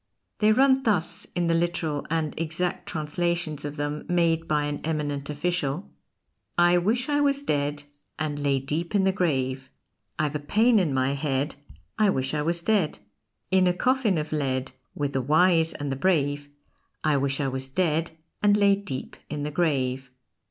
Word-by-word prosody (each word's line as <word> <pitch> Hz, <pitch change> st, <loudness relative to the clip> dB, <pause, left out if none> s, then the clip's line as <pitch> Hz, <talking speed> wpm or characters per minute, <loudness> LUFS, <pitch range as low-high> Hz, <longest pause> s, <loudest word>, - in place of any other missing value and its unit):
They 215 Hz, 0 st, +5 dB
run 265 Hz, +3 st, +4 dB
thus 205 Hz, -10 st, 0 dB
in 175 Hz, -1 st, +1 dB
the 170 Hz, -, +2 dB
literal 165 Hz, -3 st, -1 dB
and 160 Hz, -2 st, -1 dB
exact 165 Hz, +2 st, -2 dB
translations 160 Hz, -1 st, -2 dB
of 145 Hz, 0 st, -5 dB
them 145 Hz, 0 st, -3 dB
made 165 Hz, -2 st, +2 dB
by 150 Hz, -1 st, +1 dB
an 145 Hz, 0 st, -3 dB
eminent 145 Hz, -3 st, -2 dB
official: 150 Hz, +1 st, -2 dB, 0.7 s
I 175 Hz, 0 st, +5 dB
wish 230 Hz, +8 st, 0 dB
I 290 Hz, -1 st, +1 dB
was 280 Hz, -1 st, +2 dB
dead, 145 Hz, -, -1 dB, 0.3 s
And 150 Hz, -2 st, -2 dB
lay 140 Hz, -1 st, +1 dB
deep 155 Hz, +8 st, -3 dB
in 200 Hz, -, +4 dB
the 190 Hz, -, +3 dB
grave. 130 Hz, -8 st, -1 dB, 0.5 s
I've 155 Hz, -1 st, 0 dB
a -, -, 0 dB
pain 220 Hz, +10 st, +3 dB
in 170 Hz, -6 st, +1 dB
my 130 Hz, +1 st, +1 dB
head, 140 Hz, 0 st, -1 dB, 0.5 s
I 210 Hz, -1 st, +5 dB
wish 135 Hz, -6 st, 0 dB
I 150 Hz, -, 0 dB
was 170 Hz, +2 st, 0 dB
dead. 195 Hz, -6 st, +1 dB, 0.5 s
In 190 Hz, -1 st, +4 dB
a 180 Hz, -, +3 dB
coffin 250 Hz, -3 st, +2 dB
of 155 Hz, 0 st, -3 dB
lead 130 Hz, -3 st, -1 dB, 0.2 s
With 145 Hz, -1 st, -2 dB
the 135 Hz, -, +1 dB
Wise 165 Hz, +4 st, +4 dB
and 145 Hz, -2 st, -4 dB
the -, -, -1 dB
Brave 145 Hz, -3 st, 0 dB, 0.5 s
I 155 Hz, -2 st, +3 dB
wish 135 Hz, 0 st, 0 dB
I 140 Hz, -, 0 dB
was 130 Hz, 0 st, -4 dB
dead, 165 Hz, +1 st, 0 dB, 0.3 s
And 205 Hz, 0 st, +4 dB
lay 200 Hz, -1 st, +4 dB
deep 185 Hz, -11 st, -6 dB
in 150 Hz, -1 st, -4 dB
the 150 Hz, -, -3 dB
grave. 135 Hz, -5 st, 0 dB
155 Hz, 175 wpm, -26 LUFS, 145-180 Hz, 0.7 s, They